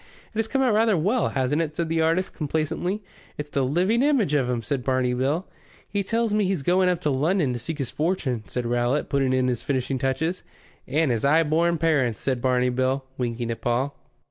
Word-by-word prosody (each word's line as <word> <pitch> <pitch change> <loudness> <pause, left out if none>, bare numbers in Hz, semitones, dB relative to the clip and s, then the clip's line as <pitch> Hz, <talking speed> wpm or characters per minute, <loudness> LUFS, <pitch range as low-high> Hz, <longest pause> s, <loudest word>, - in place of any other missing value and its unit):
"It 220 - -3
has 225 - +1
come 270 +4 +1
out 245 -4 +3
rather 220 -2 +3
well, 210 +10 +1
hasn't 135 +3 0
it?" 155 -2 -3
said 170 0 -1
the 165 0 0
artist, 165 +4 +1
complacently. 160 +6 -2 0.3
"It's 150 0 -6
the 140 - +1
living 180 - +2
image 265 - +2
of 135 -4 +2
'im," 120 -2 -1
said 125 +3 -2
Barney 130 -1 +1
Bill. 140 +8 0 0.4
"He 205 - -1
tells 225 +1 0
me 210 0 +2
he's 185 -6 -1
going 180 +3 +3
up 180 -2 0
to 150 - +1
London 150 +1 +1
to 120 - -4
seek 150 +7 -5
his 135 -4 -3
fortune," 150 -8 -1
said 125 -1 -3
Rowlatt, 120 +4 0
putting 135 -2 +1
in 130 -1 +2
the 125 -1 +1
finishing 130 +2 -2
touches. 135 +8 -1 0.5
"And 150 +1 +1
his 115 -2 -1
'igh 155 +4 +4
born 170 +2 +2
parents," 145 -9 +1
said 130 -3 -1
Barney 125 0 +2
Bill, 130 +2 0
winking 120 -1 -2
at 115 - -5
Paul. 125 +4 0
145 Hz, 215 wpm, -24 LUFS, 130-175 Hz, 0.5 s, igh